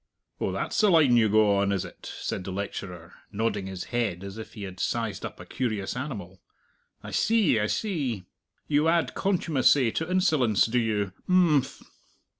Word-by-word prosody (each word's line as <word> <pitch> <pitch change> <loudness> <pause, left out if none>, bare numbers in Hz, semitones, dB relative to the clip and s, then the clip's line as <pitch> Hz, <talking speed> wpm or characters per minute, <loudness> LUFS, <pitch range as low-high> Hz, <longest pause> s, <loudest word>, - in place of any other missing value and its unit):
"Oh, - - -1
that's - - -1
the 210 - +5
line 155 -8 +5
you 110 -2 +4
go 105 -1 +4
on, 100 0 +1
is 95 -2 -1
it?" - - -10
said - - -4
the 95 - -6
lecturer, 90 -3 -6 0.2
nodding 105 -2 -1
his 95 -2 -5
head 110 -7 -1
as 100 +2 -7
if 110 - -9
he 105 - -8
had 95 -2 -8
sized 115 -3 -2
up - - -7
a - - -9
curious 110 -6 -3
animal. 100 - -6 0.6
"I - - -8
see, 215 - +3
I 105 - +1
see! 135 - -2 0.4
You 150 +1 +2
add 170 0 +2
contumacy 145 - +2
to 160 +7 -3
insolence, 155 - +3
do 125 +2 +1
you?... 105 -4 -1 0.2
Imphm." 165 -7 +2
115 Hz, 175 wpm, -27 LUFS, 100-150 Hz, 0.6 s, the